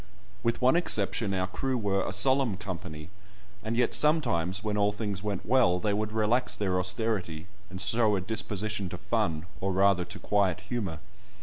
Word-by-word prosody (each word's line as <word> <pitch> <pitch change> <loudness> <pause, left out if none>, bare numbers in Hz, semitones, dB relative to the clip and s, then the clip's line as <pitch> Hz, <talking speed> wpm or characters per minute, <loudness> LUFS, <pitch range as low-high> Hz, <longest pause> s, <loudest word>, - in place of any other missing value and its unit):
With 115 +3 -1
one 130 +4 +5
exception, 110 - +1
our 95 0 0
crew 130 +7 -2
were 100 -4 0
"a - - -2
solemn 120 +2 +3
company," 85 -4 -7 0.5
and 110 +2 -2
yet, 120 -1 +2
sometimes, 95 - +2
when 105 -1 -1
all 105 0 +2
things 105 -2 -4
went 100 -3 -4
well, 120 -8 +3
they 100 +2 -1
would 105 +1 -2
relax 110 +1 +1
their 95 -3 0
austerity, 90 -4 -1 0.2
and 95 - -7
show 110 +1 +2
a 95 - -1
disposition 105 -1 -3
to - - -6
fun, 80 0 -1
or 95 +1 -1
rather 95 -1 +3
to 90 - -7
quiet 100 -4 0
humour. 105 -10 -4
100 Hz, 175 wpm, -28 LUFS, 95-110 Hz, 0.5 s, one